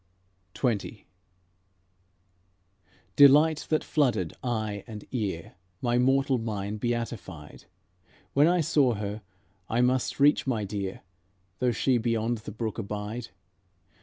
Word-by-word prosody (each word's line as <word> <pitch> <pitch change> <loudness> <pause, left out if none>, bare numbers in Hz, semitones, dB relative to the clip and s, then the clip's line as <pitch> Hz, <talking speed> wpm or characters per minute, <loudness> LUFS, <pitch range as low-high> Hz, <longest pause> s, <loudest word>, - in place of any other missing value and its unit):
XX 110 -4 -2 2.1
Delight 150 +2 +6
that 155 - +1
flooded 120 - +1
eye 110 -5 -2
and 105 -3 -8
ear 100 -10 -3 0.3
My 120 0 +1
mortal 135 0 +3
mind 105 -2 -4
beatified; 115 -10 -4 0.7
When 145 +3 +5
I 175 0 +3
saw 145 -6 +3
her, 105 +1 -4 0.5
I 115 +2 +2
must 125 +2 +1
reach 145 0 +4
my 115 -5 0
dear, 100 -1 -4 0.6
Though 125 -1 +2
she 125 +1 +1
beyond 115 0 0
the 105 - -8
brook 110 +1 -4
abide. 105 +3 -5
115 Hz, 110 wpm, -27 LUFS, 105-130 Hz, 2.1 s, Delight